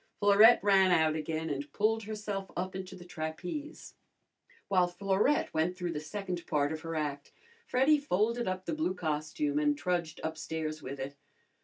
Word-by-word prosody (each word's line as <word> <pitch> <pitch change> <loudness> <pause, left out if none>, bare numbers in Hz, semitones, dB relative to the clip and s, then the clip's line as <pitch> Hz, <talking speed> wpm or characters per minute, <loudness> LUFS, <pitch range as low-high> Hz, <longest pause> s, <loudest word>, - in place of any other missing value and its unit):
Florette 205 +3 +7
ran 195 -2 +5
out 160 -3 +3
again 160 +1 -3
and 140 0 -4
pulled 220 +1 +1
herself 210 -2 -4
up 185 +1 -3
into 190 0 -6
the 175 -1 -12
trapeze. 180 - -6 0.7
While 185 -3 +3
Florette 195 +10 +1
went 170 +3 0
through 175 -2 -2
the 155 - -3
second 180 +2 -5
part 145 0 +1
of 160 0 -4
her 165 0 -5
act 145 -2 -3 0.4
Freddy 280 +4 +4
folded 235 -1 0
up 185 0 -3
the - - -2
blue 310 -12 -1
costume 160 - -1
and 295 -1 +2
trudged 175 - -2
upstairs 160 -1 -4
with 135 0 -6
it. 140 +2 -5
180 Hz, 165 wpm, -31 LUFS, 155-210 Hz, 0.7 s, Florette